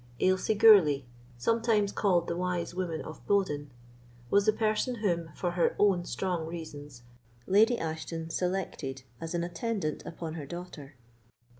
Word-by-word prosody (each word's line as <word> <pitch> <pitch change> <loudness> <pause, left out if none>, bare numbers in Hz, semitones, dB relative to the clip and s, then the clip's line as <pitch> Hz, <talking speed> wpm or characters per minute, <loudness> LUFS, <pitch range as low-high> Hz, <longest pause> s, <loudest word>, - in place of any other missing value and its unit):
Ailsie 185 +3 +2
Gourlay, 195 -11 +7 0.3
sometimes 220 - +2
called 180 -5 +2
the 170 - -2
Wise 180 -1 -2
Woman 175 -3 -3
of 155 - -10
Bowden, 150 -8 +1 0.6
was 200 +1 +4
the - - +7
person 215 +3 0
whom, 175 -7 -1
for 175 - -1
her 175 -1 +1
own 190 -4 +3
strong 175 -4 -2
reasons, 145 -6 -8 0.4
Lady 220 +5 +4
Ashton 160 0 -4
selected 175 -8 -3 0.2
as 165 +1 -4
an 170 - 0
attendant 175 -2 -2
upon 165 -1 -6
her 155 -4 -6
daughter. 160 -4 -8
175 Hz, 140 wpm, -29 LUFS, 160-200 Hz, 0.6 s, Gourlay